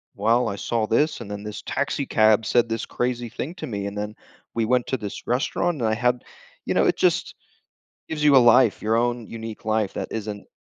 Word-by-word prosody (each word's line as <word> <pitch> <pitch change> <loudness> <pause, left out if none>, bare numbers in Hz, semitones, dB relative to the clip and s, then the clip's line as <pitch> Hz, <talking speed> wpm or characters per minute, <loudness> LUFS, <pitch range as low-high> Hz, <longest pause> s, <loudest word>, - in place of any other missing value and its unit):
"Well, 115 +3 +2
I 100 - -3
saw 110 +2 -1
this, 145 +4 +1
and 110 - -8
then 105 0 -6
this 105 0 -6
taxi - - -2
cab 110 0 +4
said 120 +1 +3
this 115 0 -3
crazy 120 -1 -2
thing 135 +8 -5
to 170 - -6
me, 100 -3 -4
and 100 +1 -5
then 105 +1 -4 0.4
we 115 -1 0
went 125 +1 +1
to 130 - -1
this 105 -4 -7
restaurant, 145 +6 0
and 115 - +2
I - - +1
had" 125 +2 +1 0.4
you - - 0
know, - - +3
it - - +2
just - - +1 0.7
gives 150 -1 -3
you 145 -2 +6
a - - +10
life, 120 -2 +5
your 110 +1 +2
own 120 -1 0
unique 115 -1 -8
life 110 -2 0
that - - -4
isn't 105 -2 -5
115 Hz, 220 wpm, -24 LUFS, 105-125 Hz, 0.7 s, a